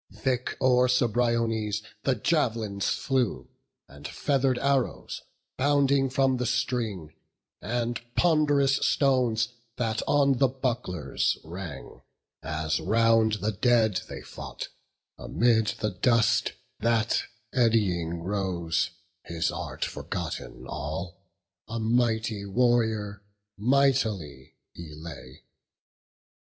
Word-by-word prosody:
Thick 125 +3 -1
o'er 125 -1 +4
Cebriones 115 -3 +1 0.2
the 135 - +3
jav'lins 110 -7 0
flew, 130 -4 -1 0.4
And 70 +1 -9
feather'd 135 -3 +1
arrows, 135 -1 -1 0.4
bounding 140 -1 +3
from 130 0 +2
the 125 -1 -1
string; 105 - -2 0.5
And 120 +1 -2
pond'rous 145 -5 +3
stones 125 -5 +2 0.3
that 115 -2 -1
on 140 -3 +3
the 135 - +5
bucklers 120 - -1
rang, 85 -4 -8 0.4
As 80 -1 -1
round 115 -1 +3
the 110 - +1
dead 110 -2 +2
they - - -7
fought; - - -7 0.5
amid 110 - +2
the 105 -1 0
dust 110 +3 +2 0.3
That 115 -1 +2 0.3
eddying 90 -9 +1
rose, 90 -4 -1 0.4
his 85 -1 -1
art - - -4
forgotten 60 +1 -5
all, 85 +6 -5 0.5
A 115 +1 -4
mighty 110 -2 +1
warrior, 110 -2 +1 0.3
mightily 110 - +1 0.2
he 80 -3 -9
lay. 75 -5 -10
115 Hz, 95 wpm, -27 LUFS, 95-125 Hz, 0.5 s, the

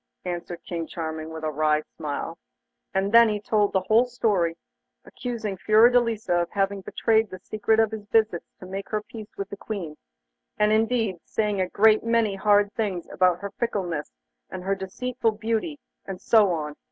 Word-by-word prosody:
answered 175 -1 -4
King 165 -2 -4
Charming, 160 -2 -5
with 160 0 -8
a 155 - -1
wry 155 0 +1
smile. 155 +3 -5 0.5
And 195 +1 0
then 230 0 +7
he 210 -1 -1
told 210 0 +1
the 190 - +1
whole 220 +6 +3
story, 200 -9 0 0.5
accusing 225 -6 -5
Fiordelisa 220 -3 +3
of 170 - -3
having 195 0 -1
betrayed 220 +2 +1
the 185 - -8
secret 215 +3 0
of 225 -1 +3
his 215 -2 -7
visits 215 -6 +1
to - - -10
make 195 +1 -6
her 215 -1 -2
peace 215 -1 -10
with 200 0 -4
the 200 - -6
Queen, 190 -8 -5 0.6
and 210 0 +3
indeed 220 -3 +1
saying 210 -3 -1
a 185 - -1
great 215 +2 +4
many 230 -3 +2
hard 205 +1 +3
things 195 -6 -2
about 180 -1 +2
her 200 -1 -5
fickleness 185 -10 -2 0.4
and 185 -1 -7
her 195 +1 0
deceitful 225 +5 -2
beauty, 225 +8 -2 0.3
and 190 -2 -6
so 215 -4 +4
on. 150 -3 -3
205 Hz, 175 wpm, -25 LUFS, 180-220 Hz, 0.6 s, then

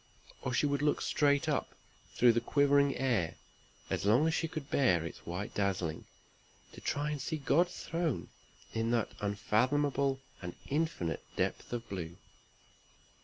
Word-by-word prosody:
Or 130 - -2
she 125 - +2
would 140 -1 +1
look 150 0 +2
straight 145 -1 +2
up - - -1 0.4
through 120 -1 +6
the 115 - +1
quivering 140 -1 +3
air, 115 -11 +1 0.5
as - - -2
long 115 +9 +4
as 160 - +2
she 165 - 0
could 155 -3 -6
bear 90 - +3
its 80 - -9
white 90 +4 -4
dazzling, 90 -5 -1 0.7
to - - -11
try 145 +1 -1
and 145 -2 -3
see 155 - -2
God's 170 +5 +1
throne 165 -5 -1 0.4
in 115 0 0
that 115 -2 +1
unfathomable 130 +7 +1 0.2
and 90 -1 -6
infinite 140 - -1
depth - - -1
of 120 -1 -4
blue. 85 -3 -5
130 Hz, 150 wpm, -32 LUFS, 100-145 Hz, 0.7 s, through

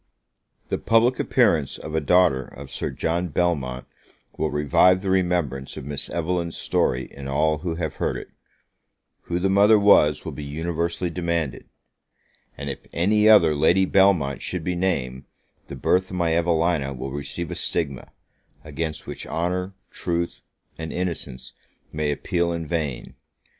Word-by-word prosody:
The - - -1
public 115 +3 +3
appearance 115 - +2
of 80 - -8
a 80 - +1
daughter 85 -5 +3
of 70 0 -11
Sir - - -3
John 85 +2 -1
Belmont 70 -7 -1 0.5
will - - -1
revive 75 +6 +3
the 95 - 0
remembrance 85 -8 0
of - - -7
Miss 70 0 -3
Evelyn's 85 0 -2
story 65 +1 0
in 70 -1 -8
all 75 +2 +1
who 85 +1 -3
have 80 -3 -4
heard - - -1
it, - - -9 1.0
who 85 - -2
the 90 +2 +1
mother 100 +3 +5
was, 90 -8 +4
will - - -4
be 75 - -7
universally 85 +4 -2
demanded, 85 -5 -2 0.9
and 70 - -6
if 70 - -4
any 105 +5 +3
other 85 -8 +7
Lady 85 +6 +3
Belmont 90 -8 +3
should 90 -3 -3
be 90 - -1
named, 70 -8 -2 0.4
the - - -7
birth 95 +1 +1
of 90 - -5
my 85 -2 +1
Evelina 85 -4 +1
will 65 +2 -5
receive 70 +4 -5
a - - -3
stigma, 70 -6 -2 0.5
against 75 +1 -4
which, - - -7
honour, 90 +3 -2 0.2
truth, 85 -1 -3 0.4
and 80 0 -5
innocence 85 -8 -5 0.4
may 75 -1 0
appeal 85 +4 -1
in 85 -1 -3
vain! 75 -6 -3
85 Hz, 155 wpm, -24 LUFS, 70-90 Hz, 1.0 s, other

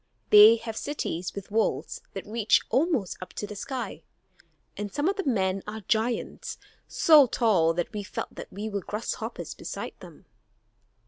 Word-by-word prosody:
They 210 +2 +10
have 225 -1 -6
cities 185 - -4
with 200 0 -8
walls 220 +1 0
that - - -6
reach 220 0 +2
almost 265 - +1
up 185 - -8
to - - -4
the 210 - -8
sky; 255 +5 -5 0.7
and 205 -1 -5
some 290 +3 0
of 395 - +1
the 395 - -2
men 190 -5 +1
are 220 +1 -5
giants, 225 +4 -1 0.3
so 300 -5 +6
tall 185 -9 +2
that 175 +5 -2
we 210 - -3
felt 195 - -6
that - - -9
we 205 +3 -5
were 205 -2 -2
like - - -15
grasshoppers 210 +3 -4
beside - - -6
them." 170 -4 -14
215 Hz, 170 wpm, -27 LUFS, 200-240 Hz, 0.7 s, They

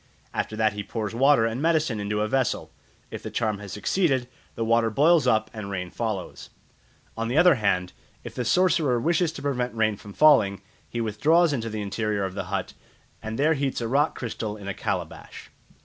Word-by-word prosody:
After 110 - -2
that 110 -1 +2
he 105 - -4
pours 110 +1 -4
water 135 -1 +4
and 115 +3 -2
medicine 155 -8 +1
into 105 +1 -2
a 105 - +1
vessel; 130 +1 -1 0.4
if - - -6
the - - -6
charm 110 -3 -1
has 100 -2 -9
succeeded, 130 - 0 0.3
the 115 - -2
water 115 0 +3
boils 150 +6 +4
up 110 -2 +2
and 105 -3 -6
rain 90 -3 -4
follows. 110 -5 -4 0.7
On 115 0 -2
the 125 +5 -1
other 175 +1 +7
hand, 95 -7 0 0.3
if - - -8
the 125 - -3
sorcerer 160 -5 +2
wishes 165 +4 +1
to 145 - -9
prevent 125 -4 -1
rain 110 -1 +1
from 100 0 -12
falling, 100 -10 +4 0.3
he 120 - -3
withdraws 150 +10 +3
into 115 -4 -2
the 110 -1 -4
interior 100 +1 -2
of 95 - -5
the 100 -1 -4
hut, 100 +2 -3 0.5
and 110 +1 -5
there 155 +3 +3
heats 140 -2 -1
a 115 - -2
rock 145 +6 +1
crystal 110 -3 -4
in 100 -2 -10
a 100 - -2
calabash. - - -5
115 Hz, 195 wpm, -25 LUFS, 105-140 Hz, 0.7 s, other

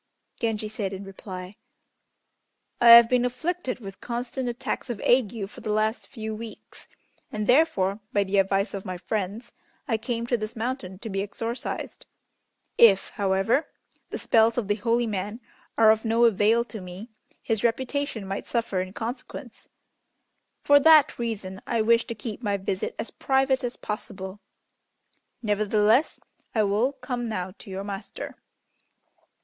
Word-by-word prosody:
Genji 220 -2 -1
said 210 -2 -4
in 190 +1 -6
reply, 190 0 -9 1.2
"I 240 - +7
have 235 0 +11
been 250 0 +2
afflicted 255 +3 -2
with 195 -4 -10
constant 245 +1 -3
attacks 245 +1 -4
of 235 -4 -3
ague 230 -4 +2
for - - -13
the 215 - -3
last 215 +2 0
few 220 -4 -6
weeks, 220 +1 -10 0.4
and, 215 0 -2
therefore, 210 -8 +3
by 205 - +2
the 195 +1 +1
advice 195 +1 +1
of 195 -1 -4
my 185 -1 -5
friends, 210 +5 -4 0.4
I 225 -4 +1
came 235 +1 -3
to 240 0 +1
this 215 0 -5
mountain 225 -5 -4
to 220 +3 -7
be 195 0 -1
exorcised. 225 +4 -5 0.7
If, 200 -5 +6
however, 195 +8 +1 0.4
the - - -4
spells 225 +1 +3
of 230 -5 -1
the 205 - +3
holy 230 +3 +1
man 210 +1 -3 0.4
are 220 -1 +7
of 220 0 +1
no 230 +1 +3
avail 225 +2 +4
to 220 -3 -9
me, 185 +5 -9 0.3
his 220 -1 -1
reputation 260 -1 -1
might 195 +1 -4
suffer 230 -6 -1
in 185 +1 -6
consequence. 240 +2 -7 0.9
For 285 0 +7
that 310 -3 +6
reason 200 -5 -4
I 230 -2 +1
wish 230 +1 +4
to 230 - -5
keep 220 +1 -6
my 205 -4 0
visit 190 0 -3
as 225 - -5
private 265 0 +1
as 245 0 -3
possible, 195 -2 -6 1.0
nevertheless 215 +5 +2 0.4
I 215 - +4
will 210 +6 +2
come 250 -3 -4
now 185 -4 -3
to 210 - -12
your 190 +1 -4
master." 200 -1 -6
220 Hz, 155 wpm, -26 LUFS, 200-240 Hz, 1.2 s, have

